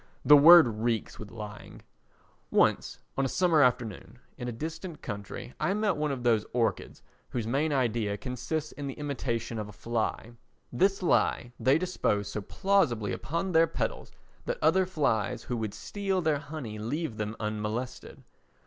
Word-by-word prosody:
The 150 - +9
word 165 +1 +9
reeks 115 0 -2
with 105 - -8
lying. 105 -1 -9 0.7
Once, - - +2 0.2
on 135 - +1
a - - +1
summer 170 -2 +3
afternoon, 120 -3 0 0.2
in 125 - -6
a - - -2
distant 160 +7 -6
country 105 +4 -6
I 195 - +1
met 210 -2 +1
one 150 -1 -1
of 130 -3 -4
those 115 -3 +3
orchids 115 -2 -1 0.3
whose 120 -3 -3
main 140 +7 0
idea 115 -6 0
consists 135 +6 -4
in 145 -1 -6
the 135 - -5
imitation 120 -6 -3
of 105 -1 -5
a - - -11
fly; 115 0 -3 0.4
this 195 +8 +2
lie 120 -7 +1
they 130 +5 +4
dispose 160 - -1
so 105 - -3
plausibly 125 - +1
upon 170 +9 -3
their 165 -1 +5
petals - - -4 0.3
that - - -2
other 190 - +3
flies 130 - 0
who 120 - -3
would 110 -3 -4
steal 195 -2 -2
their 155 -4 +1
honey 140 -7 -7
leave 130 +2 -3
them 105 +1 -3
unmolested. 110 +4 -4
125 Hz, 160 wpm, -29 LUFS, 110-160 Hz, 0.7 s, The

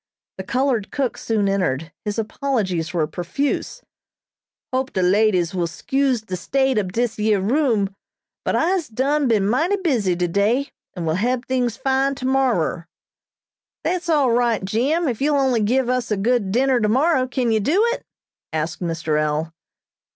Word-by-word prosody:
The - - -3
colored 250 -1 0
cook 270 -4 -1
soon 215 -3 0
entered. 165 -6 -1
His 210 +1 -2
apologies 210 - -1
were 165 -3 +1
profuse. 175 - -3 0.9
"Hope 260 +1 -1
de 185 - 0
ladies 185 -2 +2
will 175 -2 0
'scuze 265 +4 0
de 185 - -4
state 265 +6 +1
ob 190 -3 -3
dis 230 +1 -1
year 210 -1 +2
room, 220 -3 +1 0.5
but - - 0
I'se 345 0 +1
done 275 +5 0
been 210 -4 +2
mighty 320 - +2
busy 250 - 0
today, 200 +10 +1 0.2
and 175 -3 -4
will 160 - +1
hab 250 +2 0
tings 250 -3 -1
fine 270 +1 +1
tomorer." 255 - 0 1.0
"That's 360 -1 -1
all 290 -6 +3
right, 235 -4 +1
Jim, 275 - +1
if 240 -3 -2
you 295 +1 +2
only 260 -5 +2
give 245 +4 +1
us 250 -2 -1
a 210 - 0
good 215 -1 +1
dinner 255 +3 +2
tomorrow. 255 +5 +2
Can 250 -2 0
you 220 - +3
do 320 - +2
it?" - - -6 0.5
asked 160 +3 -3
Mr. 165 -3 -1
L. 155 +2 -1
230 Hz, 160 wpm, -21 LUFS, 190-265 Hz, 1.0 s, all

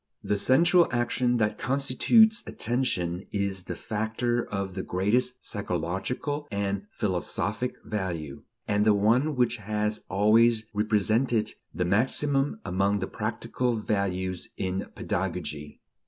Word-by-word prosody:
The 105 -1 0
central 170 - +5
action 120 0 +1
that 105 -2 0
constitutes 180 - +4
attention 95 -8 -1
is 100 -2 -2
the - - -4
factor 115 +2 -1
of 100 -2 -3
the 95 - -3
greatest 115 +8 0
psychological 105 - -3
and 100 -1 -2
philosophic 105 +3 -2
value, 85 -9 -4 0.3
and 105 0 +2
the 105 -1 +5
one 120 +9 +2
which 125 -1 +1
has 105 0 -2
always 110 +3 +4
represented 110 +2 +1 0.2
the 90 - -1
maximum 135 - +1
among 100 +2 +1
the - - -2
practical 125 -2 -2
values 95 -4 -2
in 95 0 -2
pedagogy. 85 -7 -4
105 Hz, 115 wpm, -27 LUFS, 95-125 Hz, 0.3 s, central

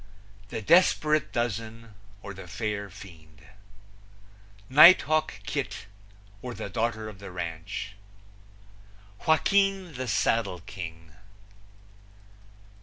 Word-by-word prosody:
The 110 +1 -6
Desperate 155 - +3
Dozen; 115 -1 -4 0.3
or, 100 - -7
The 95 -1 -11
Fair 100 +1 -4
Fiend. 80 -5 -14 1.2
Nighthawk 155 - +6
Kit; 100 +1 -4 0.6
or, 125 -1 -6
The - - -6
Daughter 110 -1 -2
of 105 -3 -10
the 100 -1 -9
Ranch. 90 +4 -6 1.3
Joaquin, 195 +2 +2
the 130 -1 -5
Saddle 105 -6 0
King. 80 -4 -9
110 Hz, 90 wpm, -27 LUFS, 95-130 Hz, 1.3 s, Nighthawk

